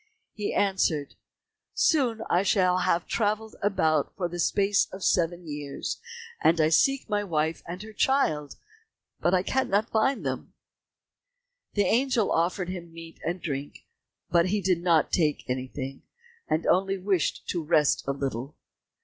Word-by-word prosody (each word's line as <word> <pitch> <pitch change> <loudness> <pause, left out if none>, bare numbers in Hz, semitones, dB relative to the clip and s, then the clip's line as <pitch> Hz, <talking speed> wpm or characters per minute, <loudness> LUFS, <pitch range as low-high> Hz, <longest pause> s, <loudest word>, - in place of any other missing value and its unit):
He 210 -1 -3
answered, 175 -7 +1 0.6
"Soon 245 -8 +2 0.2
shall 185 -2 +3
I - - 0
have 170 0 +1
travelled 215 0 -1
about 160 -7 +1
for 180 - -1
the 175 +1 -7
space 200 +3 +2
of 190 0 -8
seven 175 0 +1
years, 145 -2 -5 0.4
and 165 +1 +4
I 155 0 +4
seek 270 - +3
my 205 -1 0
wife 160 -3 -1
and 180 +4 -6
her 220 0 -10
child, 160 - +1 0.6
but 180 +1 +2
cannot 220 -4 +1
find 220 - +1
them." 130 -1 -4 1.2
The 205 -2 +3
angel 240 +1 +2
offered 175 +2 0
him 175 -2 -6
meat 165 0 -11
and 175 +2 -2
drink, 140 -2 -5 0.5
but 170 0 +4
he 205 +3 +1
did 180 -3 +1
not 170 -3 +3
take 155 -4 +1
anything, 130 +1 -4 0.5
and 155 +2 0
only 195 +2 +2
wished 185 -3 -1
to 170 -3 -1
rest 150 -1 +3
a - - +2
little. 135 -1 -4
180 Hz, 145 wpm, -27 LUFS, 155-205 Hz, 1.2 s, and